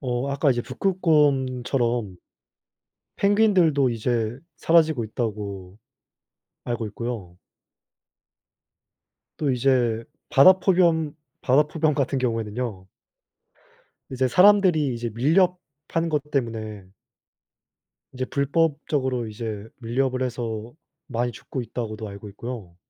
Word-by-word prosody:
어 125 0 -2
아까 140 +1 +2
이제 120 -2 0
북극곰처럼 130 - +1 1.0
"펭귄들도 185 - +3
이제 115 +1 -1 0.2
사라지고 160 -7 +3
있다."고 100 -4 -5 0.9
알고 120 -2 -3
있고요 105 -5 -6 2.0
또 145 -3 0
이제 120 -3 +1 0.3
바다포겸 170 -1 +4 0.3
바다표범 150 +3 +2
같은 140 -1 0
경우에는요 115 -4 -3 1.2
이제 130 0 0
사람들이 180 -5 +4
이제 115 0 -4
밀렵 175 +9 +3 0.3
한 165 0 0
것 150 -2 -2
때문에 110 -6 -3 1.3
이제 130 0 -2
"불법적으로 140 -4 0
이제 110 -1 -6
밀렵을 130 +2 -1
해서 115 -2 -4 0.3
많이 120 -2 -2
죽고 125 +3 -6
있다."고도 110 -2 -5
알고 100 +1 -9
있고요 105 -5 -8
125 Hz, 230 characters per minute, -24 LUFS, 115-150 Hz, 2.0 s, 바다포겸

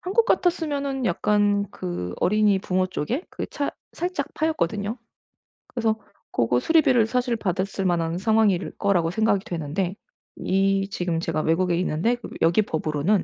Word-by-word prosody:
한국 395 +5 +2
같았으면은 290 - 0
약간 205 +1 +2
그 90 0 -4
어린이 210 0 +3
부모 185 0 0
쪽에 225 - -3
그 - - -5
차 285 - -3 0.2
살짝 345 -5 -3
파였거든요. 215 - -1 0.7
그래서 225 -3 0 0.3
고거 120 +1 +2
수리비를 260 - +4
사실 245 0 0
받았을 195 0 -2
만한 170 -2 +1
상황일 215 -2 +2
거라고 180 -5 +2
생각이 205 +1 +1
되는데 175 +2 -2 0.4
이 195 +1 +1
지금 175 -3 -1
제가 165 -2 -1
외국에 170 +3 +2
있는데 180 +6 +1
그럼 240 - -10
여기 170 +6 +4
법으로는 160 +1 0
200 Hz, 330 characters per minute, -24 LUFS, 175-235 Hz, 0.7 s, 수리비를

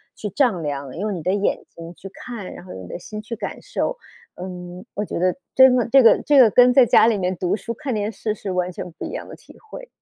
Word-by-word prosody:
去 210 - -5
丈 220 - +1
量， 140 -2 -5
用 205 +3 -2
你 170 - -6
的 180 - 0
眼 205 0 -1
睛 165 +1 -11
去 195 +3 -11
看， 215 -1 -8
然 - - -11
后 185 - -9
用 95 - -9
你 - - -11
的 - - -6
心 210 +4 -8
去 225 +2 -6
感 220 - -6
受。 - - -3 0.5
嗯， 180 0 -8
我 210 - -2
觉 - - -4
得 180 +1 +1 0.2
真 260 -1 +7
的 245 - +1
这 270 +3 +6
个 230 - +6
这 290 -2 +4
个 240 -4 +8
跟 250 +3 +5
在 260 - +7
家 - - +6
里 230 -1 +3
面 180 0 -2
读 180 +2 0
书 230 +2 -6
看 275 0 -4
电 210 0 -2
视 215 -1 -3
是 205 -2 -6
完 180 0 -1
全 180 - -7
不 160 - -7
一 - - -5
样 - - -6
的 - - -10
体 - - -18
会。 - - -11
205 Hz, 290 characters per minute, -21 LUFS, 180-235 Hz, 0.5 s, 个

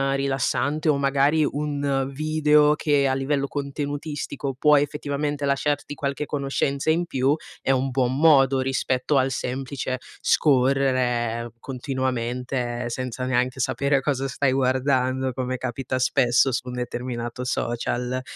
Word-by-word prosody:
rilassante 140 +3 0
o 145 - +3
magari 140 +3 +2
un 140 -2 -1
video 150 0 +3
che 145 -2 +2
a 130 - +1
livello 140 +1 0
contenutistico 145 -1 -4
può, 150 +1 +5
effettivamente, 145 0 -2
lasciarti 145 +1 0
qualche 140 +1 -3
conoscenza 140 0 -1
in 170 +2 +2
più, 135 -1 +1 0.3
è - - -4
un 135 0 +1
buon 130 -1 +1
modo 135 -4 +5
rispetto 130 +1 0
al 130 0 +3
semplice 130 0 -3 0.2
scorrere 125 -4 +2
continuamente, 125 -2 -3
senza 125 +1 -4
neanche 125 +1 0
sapere 140 +2 +1
cosa 135 -1 -1
stai 135 0 0
guardando, 130 0 +1
come 130 0 -3
capita 130 +1 -3
spesso 125 +1 +3
su 125 - -2
un 125 - -5
determinato 125 0 -4
social. 125 0 -2
135 Hz, 125 wpm, -24 LUFS, 125-145 Hz, 0.3 s, può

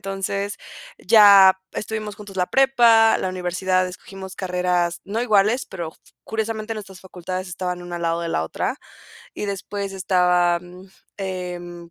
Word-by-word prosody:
Entonces 195 +1 -3 0.4
ya 200 -2 +7
estuvimos 215 -1 -4
juntos 205 -2 -11
la 180 -1 +1
prepa, 235 -4 +5
la - - -2
universidad, 185 0 0
escogimos 190 +1 -10
carreras 180 -2 -1
no 210 +4 -3
iguales, 215 +2 +2
pero 170 -4 -6
s - - -27 0.2
curiosamente 220 0 -3
nuestras 195 -3 -9
facultades 185 0 -6
estaban 180 0 -4
una 175 0 -6
al 170 - -6
lado 165 0 0
de 170 - -3
la 80 - -1
otra 80 - -3 0.6
y - - -4
después 200 0 -4
estaba, 180 -2 +2
mm, 180 +2 -14 0.3
em, 175 -3 -6
190 Hz, 145 wpm, -22 LUFS, 180-205 Hz, 0.6 s, ya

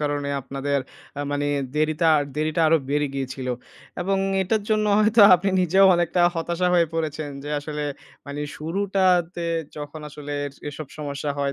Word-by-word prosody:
কারণে, 145 -1 -1
আপনাদের 140 +1 -2 0.4
আ - - -1
মানি 145 0 -1 0.3
দেরিতা 155 +2 +2 0.3
দেরিটা 155 +2 0
আরো 165 - +5
বেড়ে 145 +1 +1
গিয়েছিল। 130 -1 -4 0.5
এবং 195 +2 0 0.2
এটার 210 +3 0
জন্য 215 0 +2
হয়তো 215 +1 +4 0.2
আপনি 190 +3 -1
নিজেও 190 +2 +5
অনেকটা 175 +1 +1
হতাশা 170 +2 -1
হয়ে 170 -1 +4
পড়েছেন, 155 -2 -3
যে - - -6
আসলে 150 0 -5 0.4
মানে 140 +1 -5 0.2
শুরুটাতে 180 0 0 0.3
যখন 150 +1 -7
আসলে 145 0 -8
এর 140 - -8 0.2
এসব 145 +1 -7
সমস্যা 145 -1 -3
হয়, 140 -1 0
155 Hz, 150 wpm, -24 LUFS, 145-175 Hz, 0.5 s, আরো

